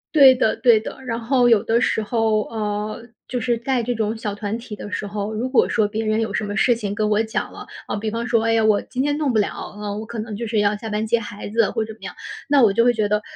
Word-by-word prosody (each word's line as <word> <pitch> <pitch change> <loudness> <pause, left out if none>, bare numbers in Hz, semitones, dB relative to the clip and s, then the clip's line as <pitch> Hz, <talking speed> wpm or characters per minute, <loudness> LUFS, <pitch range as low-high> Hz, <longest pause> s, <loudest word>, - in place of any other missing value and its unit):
对 275 -3 +9
的 245 -3 +1
对 235 -4 +5
的， 215 - -7
然 230 -1 -2
后 245 +1 +3
有 225 -3 +5
的 230 +2 +1
时 220 - +1
候， 220 -1 +1
呃， 215 +1 -4 0.2
就 250 -1 -3
是 240 0 +1
在 245 +1 -1
这 245 +2 -1
种 220 0 -2
小 215 -2 -3
团 205 +1 -3
体 230 -2 -10
的 205 - -7
时 205 - -3
候， 205 +1 -4
如 240 +4 -2
果 260 - +4
说 220 -3 +2
别 220 +1 -3
人 215 +1 +1
有 220 - -2
什 215 - -1
么 205 0 -4
事 240 +5 +4
情 210 -3 -4
跟 215 -1 0
我 210 +1 +3
讲 220 - -3
了， - - -10 0.2
啊， - - -2
比 215 +1 -2
方 230 +2 -3
说 240 -1 +2
“哎 225 - +3
呀， 225 - +3
我 215 -2 +3
今 260 +1 -3
天 290 0 0
弄 295 -5 0
不 220 - +2
了。 205 - -3
嗯， 210 0 -4
我 220 - -6
可 235 - -8
能 215 0 -5
就 235 - -4
是 220 -1 0
要 205 0 +3
下 225 - -7
班 215 +1 -1
接 235 +2 +2
孩 205 -2 -7
子” 225 0 +2
或 225 - -1
者 220 - -7
怎 - - -16
么 - - -18
样， 180 - -7 0.3
那 285 -1 +4
我 210 - +6
就 230 +4 +3
会 245 - +5
觉 215 -2 0
得， 210 0 +1
220 Hz, 320 characters per minute, -21 LUFS, 210-235 Hz, 0.3 s, 对